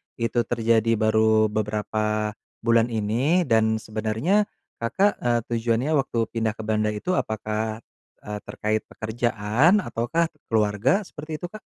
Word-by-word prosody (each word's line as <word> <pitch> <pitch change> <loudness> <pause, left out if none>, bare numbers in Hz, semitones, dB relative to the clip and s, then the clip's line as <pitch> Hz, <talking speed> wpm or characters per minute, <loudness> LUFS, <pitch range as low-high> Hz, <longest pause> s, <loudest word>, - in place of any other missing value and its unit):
itu 120 0 0
terjadi 115 -1 +2
baru 110 0 +3
beberapa 105 0 -1 0.3
bulan 115 0 +4
ini, 120 - +1
dan 110 -2 +2
sebenarnya 110 - 0 0.3
Kakak, 195 - +2
eee, 120 -1 +1
tujuannya 120 +4 0
waktu 135 -4 -1
pindah 110 -2 0
ke 110 - -7
Belanda 110 0 +1
itu 105 +12 -3
apakah, 110 +1 -2 0.4
eee, 105 0 -5
terkait 110 0 -1
pekerjaan 120 - +1
ataukah 160 +8 -1 0.2
keluarga, 110 - +2
seperti 155 -4 -7
itu, - - -3
Kak? 215 - -10
115 Hz, 130 wpm, -24 LUFS, 110-120 Hz, 0.4 s, bulan